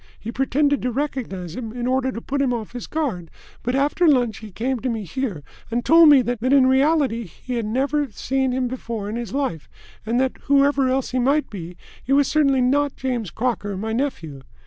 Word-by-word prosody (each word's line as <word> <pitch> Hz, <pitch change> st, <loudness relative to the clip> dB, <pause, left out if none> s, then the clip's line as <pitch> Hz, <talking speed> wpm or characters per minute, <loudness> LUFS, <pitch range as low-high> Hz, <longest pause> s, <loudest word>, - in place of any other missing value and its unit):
He 225 Hz, -, -6 dB
pretended 280 Hz, +3 st, +1 dB
to 250 Hz, -, -1 dB
recognise 230 Hz, -, -4 dB
him, 225 Hz, -3 st, -6 dB
in 245 Hz, 0 st, -4 dB
order 260 Hz, +1 st, +1 dB
to 230 Hz, -, -6 dB
put 280 Hz, +3 st, -2 dB
him 265 Hz, -3 st, +1 dB
off 230 Hz, -3 st, -4 dB
his 245 Hz, 0 st, -7 dB
guard, 240 Hz, -, -3 dB, 0.3 s
but 245 Hz, +2 st, -1 dB
after 290 Hz, +5 st, +2 dB
lunch 245 Hz, -7 st, +3 dB
he 220 Hz, -, -10 dB
came 245 Hz, +6 st, -2 dB
to 255 Hz, -, -2 dB
me 225 Hz, -3 st, -3 dB
here 195 Hz, -, -4 dB, 0.3 s
and 235 Hz, +1 st, -2 dB
told 330 Hz, -1 st, +7 dB
me 275 Hz, -3 st, +7 dB
that 245 Hz, -1 st, -3 dB
in 260 Hz, +2 st, +4 dB
reality 265 Hz, -3 st, +2 dB
he 225 Hz, +8 st, -8 dB
had 230 Hz, -3 st, -2 dB
never 275 Hz, +5 st, 0 dB
seen 265 Hz, +4 st, -1 dB
him 255 Hz, 0 st, 0 dB
before 230 Hz, -4 st, -5 dB
in 215 Hz, -, -4 dB
his 235 Hz, -4 st, -5 dB
life, 265 Hz, -, -3 dB, 0.3 s
and 230 Hz, +3 st, 0 dB
that, 260 Hz, 0 st, 0 dB
whoever 280 Hz, -1 st, +3 dB
else 265 Hz, 0 st, -1 dB
he 255 Hz, -, 0 dB
might 280 Hz, +5 st, +1 dB
be, 175 Hz, -3 st, -8 dB, 0.3 s
he 270 Hz, -, 0 dB
was 280 Hz, -1 st, +4 dB
certainly 275 Hz, -4 st, +3 dB
not 280 Hz, +3 st, +1 dB
James 245 Hz, -7 st, -3 dB
Crocker, 215 Hz, -4 st, -2 dB
my 220 Hz, +3 st, -3 dB
nephew." 170 Hz, -, -3 dB
255 Hz, 210 wpm, -22 LUFS, 225-275 Hz, 0.3 s, told